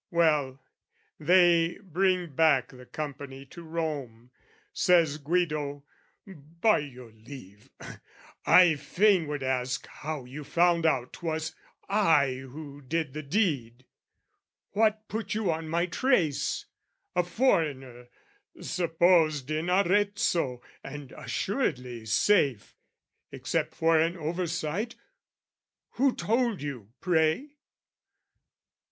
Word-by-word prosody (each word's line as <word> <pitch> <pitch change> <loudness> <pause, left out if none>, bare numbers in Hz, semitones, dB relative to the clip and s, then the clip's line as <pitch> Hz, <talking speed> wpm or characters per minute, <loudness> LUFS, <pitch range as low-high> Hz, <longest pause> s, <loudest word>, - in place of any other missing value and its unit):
Well, 150 -6 +1 0.6
they 170 +1 +4
bring 185 -3 0
back 140 -4 +3
the 125 -1 -14
company 140 -2 -7
to 170 +5 -12
Rome. 145 -8 -5 0.4
Says 165 -5 +3
Guido, 150 -3 -1 0.4
"By 170 +3 0
your 125 -5 -9
leave, 110 -3 -13 0.7
I 175 -4 +6
fain 180 +4 +2
would 145 -2 -4
ask 130 0 -1
"How 150 -3 -6
you 140 +4 -8
found 170 +1 +2
out 125 -5 0
'twas 160 -1 -3 0.3
I 165 -10 +3
who 140 +2 -10
did 150 +1 -2
the 155 - -5
deed? 140 - -1 0.9
"What 215 +1 +1
put 220 -1 -4
you 210 -5 0
on 160 0 -4
my 170 +2 +1
trace, 180 - 0 0.5
a 180 - +3
foreigner, 150 - 0 0.5
"Supposed 165 -4 +2
in 155 +3 -1
Arezzo, 185 -8 +1 0.2
and 140 -1 -8
assuredly 125 - -3
safe 125 - +2 0.6
"Except - - -2
for 165 0 +3
an 165 +3 +1
oversight: 170 +5 -3 1.0
who 265 0 +1
told 230 - 0
you, 125 -8 -6
pray?" 175 - +1
160 Hz, 100 wpm, -28 LUFS, 135-180 Hz, 1.0 s, I